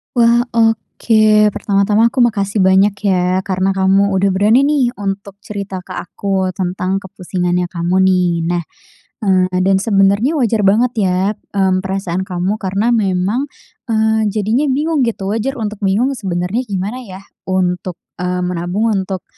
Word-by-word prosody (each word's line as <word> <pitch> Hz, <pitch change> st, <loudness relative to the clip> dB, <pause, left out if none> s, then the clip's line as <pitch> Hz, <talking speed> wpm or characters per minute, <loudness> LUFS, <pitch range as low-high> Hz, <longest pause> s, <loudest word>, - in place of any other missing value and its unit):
Wah. 235 Hz, 0 st, +4 dB
Oke, 215 Hz, -1 st, +3 dB
pertama-tama 205 Hz, +2 st, +1 dB
aku 250 Hz, +2 st, +1 dB
makasih 205 Hz, -3 st, +1 dB
banyak 190 Hz, +2 st, +4 dB, 0.2 s
ya, 185 Hz, 0 st, +1 dB
karena 190 Hz, 0 st, -1 dB
kamu 195 Hz, +1 st, +2 dB
udah 195 Hz, +1 st, +2 dB
berani 205 Hz, +6 st, +3 dB
nih 285 Hz, -1 st, +2 dB
untuk 200 Hz, 0 st, -5 dB
cerita 200 Hz, -3 st, -6 dB
ke -, -, -26 dB
aku 190 Hz, +1 st, -3 dB
tentang 185 Hz, +1 st, -2 dB
kepusingannya 180 Hz, -2 st, -2 dB
kamu 175 Hz, +1 st, -2 dB
nih. 180 Hz, -1 st, +2 dB, 0.2 s
Nah, 175 Hz, 0 st, -1 dB, 0.6 s
eee, 185 Hz, -2 st, +2 dB
dan 190 Hz, 0 st, +3 dB
sebenernya 200 Hz, +7 st, +2 dB
wajar 230 Hz, -6 st, +1 dB
banget 230 Hz, +5 st, +3 dB
ya, 185 Hz, -3 st, +1 dB, 0.4 s
mmm, 190 Hz, -1 st, +2 dB
perasaan 190 Hz, -2 st, -3 dB
kamu 185 Hz, +4 st, -2 dB
karena 200 Hz, +4 st, 0 dB
memang, 205 Hz, +4 st, 0 dB, 0.4 s
eee, 220 Hz, -1 st, +1 dB
jadinya 220 Hz, +7 st, 0 dB
bingung 300 Hz, +4 st, 0 dB
gitu. 200 Hz, -3 st, -3 dB
Wajar 230 Hz, +5 st, -2 dB
untuk 215 Hz, -4 st, -4 dB
bingung 205 Hz, +7 st, +1 dB
sebenernya 190 Hz, -2 st, -2 dB
gimana 200 Hz, +4 st, -3 dB
ya 190 Hz, +1 st, -10 dB, 0.2 s
untuk, 180 Hz, -1 st, -1 dB, 0.2 s
eee, 180 Hz, 0 st, -2 dB
menabung 180 Hz, +5 st, -1 dB
untuk, 190 Hz, -1 st, -4 dB
195 Hz, 140 wpm, -16 LUFS, 185-220 Hz, 0.6 s, Wah